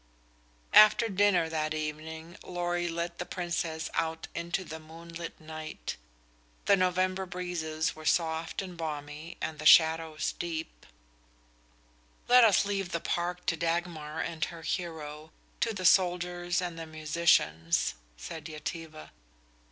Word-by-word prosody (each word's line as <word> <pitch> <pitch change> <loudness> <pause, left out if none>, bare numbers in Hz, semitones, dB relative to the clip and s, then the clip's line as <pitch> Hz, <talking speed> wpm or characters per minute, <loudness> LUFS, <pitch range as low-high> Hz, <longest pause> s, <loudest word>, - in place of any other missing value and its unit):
After 215 +2 +8
dinner 195 -4 +3
that 155 -1 -1
evening 160 +2 -5
Lorry 175 -1 -1
led 170 +1 -3
the 175 - -2
Princess 170 -3 -2
out 160 0 -1
into 170 +3 -2
the 160 -2 -7
moonlit 165 +1 -9
night. 155 0 -6 0.7
The 200 - +6
November 185 0 +1
breezes 165 -3 -2
were 155 0 -6
soft 165 +2 0
and 180 -2 -8
balmy 155 0 -6
and 155 -2 -3
the 155 - -6
shadows 160 -1 +5
deep. 165 -2 -5 1.4
"Let 250 0 +8
us 210 -3 +5
leave 195 -2 -2
the 170 - 0
park 175 +2 -2
to 165 - +1
Dagmar 165 -2 -2
and 165 -2 -3
her 165 -1 -9
hero, 155 -3 -4 0.3
to 230 - +1
the 190 -4 -4
soldiers 175 0 +3
and 170 -2 -4
the 165 - -6
musicians," 155 - +2 0.2
said 160 - -7
Yetive. 155 0 -7
165 Hz, 130 wpm, -30 LUFS, 155-175 Hz, 1.4 s, After